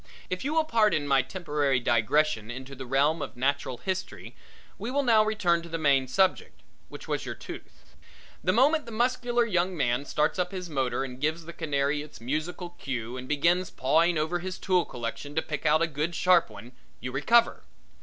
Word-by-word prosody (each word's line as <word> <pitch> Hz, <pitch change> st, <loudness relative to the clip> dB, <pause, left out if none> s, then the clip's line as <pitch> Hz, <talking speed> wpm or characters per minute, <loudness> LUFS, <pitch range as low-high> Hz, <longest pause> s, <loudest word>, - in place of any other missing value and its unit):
If 185 Hz, -, -2 dB
you 295 Hz, +4 st, -2 dB
will 320 Hz, -, +4 dB
pardon 215 Hz, -, +2 dB
my 135 Hz, -1 st, +4 dB
temporary 145 Hz, -3 st, -1 dB
digressions 120 Hz, 0 st, +1 dB
into 130 Hz, +2 st, -8 dB
the 130 Hz, -1 st, -8 dB
realm 145 Hz, +5 st, +2 dB
of 135 Hz, -3 st, -6 dB
natural 135 Hz, -1 st, -1 dB
history, 185 Hz, +6 st, -5 dB, 0.4 s
we 215 Hz, +4 st, -4 dB
will 280 Hz, +2 st, +1 dB
now 225 Hz, -4 st, +5 dB
return 185 Hz, -6 st, +1 dB
to 170 Hz, -, -11 dB
the 165 Hz, -, -3 dB
main 140 Hz, -4 st, +3 dB
subject, 190 Hz, +8 st, 0 dB, 0.3 s
which -, -, -10 dB
was -, -, -2 dB
your -, -, -5 dB
tooth. -, -, -12 dB, 0.5 s
The 185 Hz, -, +3 dB
moment 280 Hz, -, +3 dB
the -, -, -7 dB
muscular 240 Hz, +1 st, +1 dB
young 180 Hz, -3 st, 0 dB
man 125 Hz, 0 st, 0 dB
starts 150 Hz, +5 st, 0 dB
up 180 Hz, -, 0 dB
his 180 Hz, -3 st, -6 dB
motor 135 Hz, -2 st, 0 dB
and 130 Hz, -1 st, -8 dB
gives 160 Hz, +2 st, -1 dB
the 170 Hz, -, -8 dB
canary 145 Hz, -1 st, -1 dB
its 150 Hz, 0 st, -11 dB
music 155 Hz, +9 st, -3 dB, 0.2 s
cue 125 Hz, -3 st, -4 dB
and 130 Hz, 0 st, -7 dB
begins 170 Hz, +5 st, +2 dB
pawing 165 Hz, +6 st, +2 dB
over 160 Hz, +3 st, 0 dB
his 185 Hz, +1 st, -5 dB
tool 180 Hz, -3 st, +1 dB
collection 125 Hz, +4 st, -6 dB
to 160 Hz, -, +2 dB
pick 150 Hz, -2 st, -3 dB
out 155 Hz, +2 st, +4 dB
a -, -, +2 dB
good 155 Hz, +3 st, -3 dB
sharp 180 Hz, -4 st, +4 dB
one, 110 Hz, +3 st, -11 dB, 0.3 s
you 125 Hz, -, -5 dB
recover. 230 Hz, -, +3 dB
155 Hz, 195 wpm, -27 LUFS, 135-185 Hz, 0.5 s, now